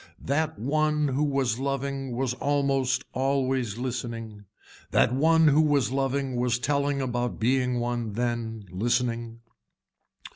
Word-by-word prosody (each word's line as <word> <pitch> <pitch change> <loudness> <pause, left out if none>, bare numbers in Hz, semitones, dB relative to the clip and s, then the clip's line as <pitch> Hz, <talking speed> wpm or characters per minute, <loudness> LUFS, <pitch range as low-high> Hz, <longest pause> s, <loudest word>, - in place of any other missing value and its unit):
That 155 +3 0
one 150 +3 +1
who 135 +3 0
was 135 -5 0
loving 135 -1 -2
was 130 0 0
almost 135 -2 +1
always 130 -4 0
listening. 115 -4 -5 0.4
That 120 - +3
one 160 +3 +5
who 150 +2 +5
was 145 -5 +2
loving 135 -1 -1
was 125 -1 +1
telling 140 +2 0
about 120 -1 -2
being 125 +1 +1
one 120 -2 -2
then 115 -2 -2
listening. 115 +2 -1
130 Hz, 120 wpm, -26 LUFS, 120-140 Hz, 0.4 s, one